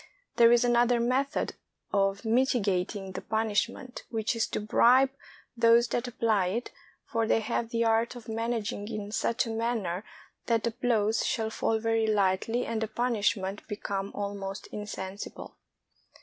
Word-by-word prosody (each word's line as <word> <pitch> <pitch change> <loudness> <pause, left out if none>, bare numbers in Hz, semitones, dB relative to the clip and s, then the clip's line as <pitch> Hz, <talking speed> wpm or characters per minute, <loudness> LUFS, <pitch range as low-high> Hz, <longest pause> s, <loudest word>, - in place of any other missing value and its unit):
There 235 0 +7
is 240 0 +5
another 240 0 +3
method 260 +5 0 0.4
of 195 +1 +1
mitigating 205 -5 +1
the - - -6
punishment, 225 +3 -1
which 220 0 -1
is 230 - 0
to - - -3
bribe 250 +5 +4 0.4
those 230 0 +5
that 245 +1 -1
apply 220 -5 +1
it, 230 +7 -3 0.3
for 225 -1 -1
they 225 - +3
have 230 +1 -2
the 230 0 0
art 225 +2 +2
of 235 -3 -11
managing 225 -2 -2
in 210 -2 -5
such 235 +3 0
a 225 - -4
manner 225 -5 -2 0.4
that 230 -2 +2
the 235 - 0
blows 225 -3 +1
shall 220 -2 -1
fall 225 0 0
very 225 0 +1
lightly 210 +3 +1
and 225 -1 -2
the 220 - 0
punishment 210 -4 0
become 200 -2 -3
almost 200 -1 -4
insensible. 205 -2 -7
225 Hz, 150 wpm, -29 LUFS, 205-235 Hz, 0.4 s, There